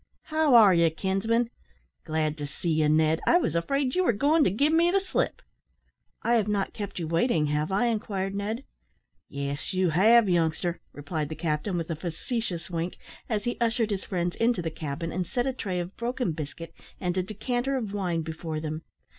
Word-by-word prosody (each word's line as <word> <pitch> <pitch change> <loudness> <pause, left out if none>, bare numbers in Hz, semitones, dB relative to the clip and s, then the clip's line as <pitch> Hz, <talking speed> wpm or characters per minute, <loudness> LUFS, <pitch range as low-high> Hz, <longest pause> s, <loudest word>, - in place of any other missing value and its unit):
How 310 -5 +4
are 210 -5 +8
ye, 170 -1 +4
kinsman? 200 +8 0 0.5
Glad 155 -1 0
to 145 - -3
see 165 +4 -3
you, 155 -1 +3
Ned. 155 +1 +3
I 350 - +6
was 350 - 0
afraid 265 +9 0
you 370 - +2
were 240 - +3
goin' 295 +8 +3
to - - +4
give 280 - +2
me 335 +1 +5
the 390 +2 +3
slip." 385 - -2 0.8
"I 235 - +2
have 215 -2 +1
not 205 -2 -1
kept 205 -2 -6
you 170 -3 -2
waiting, 165 0 +2
have 150 +3 -1
I?" 200 +5 +2
inquired 205 -4 -1
Ned. 210 +5 -3 0.7
"Yes, 140 +5 -4
you 185 -2 +2
have, 215 +6 +6
youngster," 170 0 +1
replied 145 +1 -4
the 155 - -5
captain, 160 +3 -1
with 165 0 -3
a - - -1
facetious 175 - -4
wink, 170 0 -3 0.3
as 210 -3 0
he 240 - -2
ushered 230 -1 +1
his 195 -2 -2
friends 175 -2 -2
into 230 -6 +2
the 165 - -2
cabin, 160 +1 -4
and 180 +1 -2
set 245 -2 -1
a 265 - 0
tray 190 -7 -3
of 175 +2 -5
broken 240 -4 -1
biscuit 160 +1 -7 0.3
and 180 -2 -1
a 185 - +2
decanter 245 +7 -2
of 215 -6 -4
wine 175 -5 -1
before 160 0 -4
them. 155 0 -4
185 Hz, 195 wpm, -27 LUFS, 160-230 Hz, 0.8 s, are